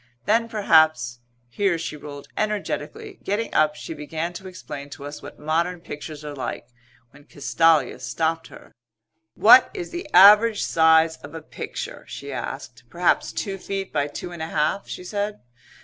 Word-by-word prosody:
Then 230 +2 +2
perhaps 155 - +3 0.2
" 120 - -42
here 175 - 0
she 160 -1 -5
rolled 145 -1 -10
energetically. 215 - -3
Getting 210 +3 -2
up 155 0 +3
she 165 - -7
began 160 +3 -4
to 190 +2 -9
explain 145 -6 -8
to 140 0 -9
us 145 +1 -8
what - - -11
modern 170 +4 -1
pictures 150 -1 -8
are 150 - -6
like 130 -3 -6 0.4
when 145 +1 -18
Castalia 160 +2 +2
stopped 165 0 -2
her. - - -15 0.6
"What 235 +4 +7
is 365 -4 -5
the 345 -3 -6
average 210 +4 +7
size 160 0 +4
of 145 +3 -12
a 160 - -6
picture?" - - -7
she - - -7
asked. - - -6
"Perhaps - - +1
two 195 -3 -4
feet 195 0 -5
by 145 -2 0
two 160 +4 -7
and 170 -2 -8
a 160 - -3
half," 155 +5 -1
she - - -7
said. 205 +2 -3
165 Hz, 165 wpm, -23 LUFS, 150-200 Hz, 0.6 s, What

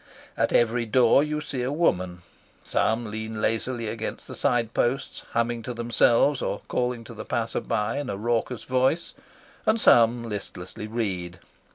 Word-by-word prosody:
At - - +1
every 120 0 +2
door 125 +4 +5
you 150 0 -2
see 140 -3 -4
a 125 +2 -1
woman. 90 - 0 0.4
Some 110 -1 0
lean 110 0 -5
lazily 115 +2 -1
against 110 +1 -5
the - - -7
side 120 -4 +1
posts, 125 +3 -1
humming 115 0 0
to 125 +1 -6
themselves 120 +3 +3
or - - -2
calling 125 -1 -1
to 115 - -10
the 110 - -7
passer 115 -1 -2
by 115 +3 -1
in 145 -3 -4
a 100 - -3
raucous 120 +2 -1
voice, 130 +6 +1 0.5
and 220 +1 +2
some 120 - +5
listlessly 105 -1 -6
read. 95 -6 -3
115 Hz, 160 wpm, -26 LUFS, 110-125 Hz, 0.5 s, door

